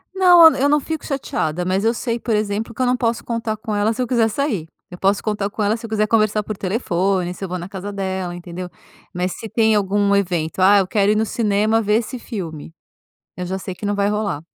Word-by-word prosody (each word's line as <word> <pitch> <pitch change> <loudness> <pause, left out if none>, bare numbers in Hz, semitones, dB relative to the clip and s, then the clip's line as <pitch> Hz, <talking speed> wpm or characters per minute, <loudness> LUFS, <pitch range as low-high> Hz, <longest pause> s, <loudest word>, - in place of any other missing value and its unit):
Não, 350 -4 +8
eu 280 +2 +2
não 295 0 +4
fico 320 +1 -5
chateada, 180 - -2
mas 190 +3 0
eu 230 - +3
sei 235 0 -2
por 225 -2 -1
exemplo, 210 +2 -2
que 255 - -5
eu - - +3
não 250 0 +2
posso 230 -2 -1
contar 230 -2 -2
com 215 -1 -4
ela 210 +2 +1
se 255 - -4
eu 250 - -1
quiser 230 -3 +2
sair, 215 - -2 0.2
eu 180 - -8
posso 195 +2 +1
contar 210 -2 -1
com 210 0 -3
ela 215 +3 +1
se 230 - -9
eu - - -8
quiser 215 -1 +1
conversar 215 -1 +2
por 215 -1 -5
telefone, 185 -3 -1
se 195 - -9
eu 190 - -4
vou 185 - -3
na 175 +2 -7
casa 200 +1 -6
dela, 190 -2 -3
entendeu? 175 +1 -7 0.4
Mas 180 0 -2
se 225 - -7
tem 220 0 +2
algum 200 0 +2
evento, 175 -3 -1
"ah, 200 +2 +6
eu 190 - 0
quero 205 0 +2
ir - - +2
no 220 - +1
cinema 215 0 +1
ver 210 0 +1
esse 240 +2 -3
filme," 165 -8 -7 0.6
eu 180 -1 -4
já 190 +1 -3
sei 185 -1 -6
que 205 - -6
não 205 - 0
vai 200 0 +1
rolar. 205 -8 -2
205 Hz, 245 wpm, -20 LUFS, 190-225 Hz, 0.6 s, Não